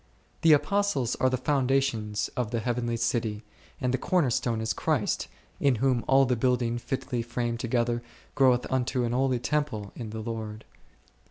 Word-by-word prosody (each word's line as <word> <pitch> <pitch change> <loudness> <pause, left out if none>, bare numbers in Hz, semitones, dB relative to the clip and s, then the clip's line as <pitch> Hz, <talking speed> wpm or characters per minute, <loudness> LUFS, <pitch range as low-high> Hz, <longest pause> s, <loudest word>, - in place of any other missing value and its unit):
The 160 -1 +7
Apostles 150 - +1
are 130 - +3
the 130 - 0
foundations 130 -5 0
of 125 -3 -1
the 115 0 -1
heavenly 120 0 -1
city, 115 -2 -1 0.4
and 125 0 0
the 130 - +1
Corner 170 -7 +2
stone 115 -1 0
is 110 0 -1
Christ, - - 0 0.3
in 140 -3 +3
whom 125 0 +1
all 135 0 +5
the 125 -1 +1
building 120 -1 +1
fitly 125 -1 -3
framed 120 0 -2
together 120 0 0 0.3
groweth 130 -3 +4
unto 130 0 0
an 120 - -1
holy 130 +1 +2
temple 120 -6 -2
in 115 -3 -6
the 110 +1 -6
Lord 110 -1 -5
x - - -31
125 Hz, 170 wpm, -27 LUFS, 115-130 Hz, 0.4 s, The